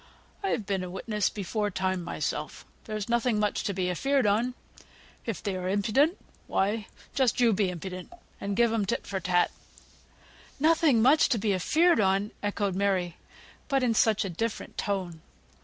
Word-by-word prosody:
I've 245 Hz, -, -1 dB
been 195 Hz, -2 st, -1 dB
a 180 Hz, -, -5 dB
witness 210 Hz, +2 st, -1 dB
before 210 Hz, +1 st, -2 dB
time 190 Hz, -1 st, -1 dB
myself; -, -, -4 dB, 0.2 s
there's 215 Hz, -2 st, -4 dB
nothing 235 Hz, -1 st, +1 dB
much 210 Hz, -1 st, 0 dB
to 205 Hz, -, 0 dB
be 185 Hz, -2 st, -1 dB
afeared 270 Hz, +8 st, +1 dB
on; 230 Hz, +5 st, +1 dB, 0.7 s
if 225 Hz, -6 st, -3 dB
they 200 Hz, -2 st, -2 dB
are 185 Hz, 0 st, -3 dB
impudent, 220 Hz, -, +2 dB, 0.3 s
why, 205 Hz, +2 st, 0 dB, 0.3 s
just 260 Hz, -4 st, +2 dB
you 235 Hz, -3 st, +5 dB
be 195 Hz, -1 st, +1 dB
impudent, 180 Hz, -, -7 dB, 0.3 s
and 200 Hz, 0 st, -3 dB
give 235 Hz, -1 st, +4 dB
'em 210 Hz, -3 st, 0 dB
tit 235 Hz, -, -1 dB
for 195 Hz, -, -3 dB
tat." 180 Hz, -1 st, +2 dB, 1.1 s
"Nothing 310 Hz, -6 st, +4 dB
much 290 Hz, +5 st, +5 dB
to 245 Hz, -, +2 dB
be 205 Hz, -1 st, +1 dB
afeared 320 Hz, -, +3 dB
on!" 195 Hz, +1 st, +2 dB
echoed 205 Hz, -1 st, -1 dB
Mary, 185 Hz, -3 st, 0 dB, 0.5 s
but 275 Hz, -3 st, +1 dB
in 240 Hz, -2 st, +3 dB
such 220 Hz, -1 st, +3 dB
a -, -, -3 dB
different 225 Hz, +6 st, -4 dB
tone. 185 Hz, -6 st, -3 dB
205 Hz, 165 wpm, -28 LUFS, 190-235 Hz, 1.1 s, you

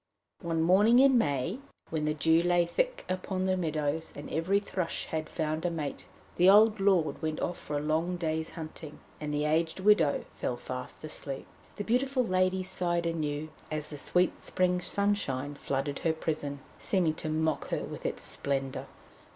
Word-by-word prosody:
One 165 Hz, -3 st, 0 dB
morning 205 Hz, +7 st, +5 dB
in 265 Hz, 0 st, +6 dB
May 145 Hz, -, 0 dB, 0.3 s
when 155 Hz, -2 st, -1 dB
the 150 Hz, 0 st, 0 dB
dew 160 Hz, +2 st, +4 dB
lay 175 Hz, 0 st, +3 dB
thick -, -, -1 dB
upon 185 Hz, 0 st, -2 dB
the 190 Hz, 0 st, +2 dB
meadows 160 Hz, -2 st, -1 dB
and 145 Hz, -, -8 dB
every 180 Hz, +6 st, +2 dB
thrush 185 Hz, -4 st, -3 dB
had 155 Hz, -1 st, -3 dB
found 155 Hz, -1 st, -2 dB
a 175 Hz, -, +2 dB
mate, 155 Hz, -4 st, -4 dB, 0.3 s
the 180 Hz, +2 st, +6 dB
old 215 Hz, +1 st, +6 dB
lord 180 Hz, -8 st, +2 dB
went 155 Hz, -1 st, -2 dB
off 175 Hz, 0 st, -2 dB
for 145 Hz, -, -3 dB
a -, -, -1 dB
long 165 Hz, +4 st, 0 dB
day's 160 Hz, -1 st, -1 dB
hunting, 155 Hz, -1 st, -7 dB, 0.2 s
and 150 Hz, -1 st, -4 dB
the 150 Hz, 0 st, 0 dB
aged 160 Hz, +3 st, +1 dB
widow 195 Hz, -7 st, +4 dB
fell 120 Hz, -, -2 dB
fast 125 Hz, +3 st, -7 dB
asleep. 140 Hz, -3 st, -5 dB, 0.3 s
The 205 Hz, -, -3 dB
beautiful 255 Hz, +3 st, +1 dB
lady 185 Hz, -1 st, +2 dB
sighed 175 Hz, -2 st, -1 dB
anew 155 Hz, -2 st, -2 dB, 0.2 s
as 155 Hz, -1 st, -4 dB
the 145 Hz, -, -6 dB
sweet 180 Hz, +5 st, +1 dB
spring 180 Hz, -1 st, +1 dB
sunshine 175 Hz, -10 st, 0 dB
flooded 140 Hz, 0 st, -2 dB
her 165 Hz, -, +1 dB
prison, 145 Hz, -3 st, -3 dB, 0.2 s
seeming 175 Hz, -5 st, +1 dB
to 155 Hz, 0 st, -4 dB
mock 155 Hz, 0 st, 0 dB
her -, -, -2 dB
with -, -, -7 dB
its -, -, -2 dB
splendour. 135 Hz, -1 st, -1 dB
165 Hz, 175 wpm, -30 LUFS, 150-185 Hz, 0.3 s, in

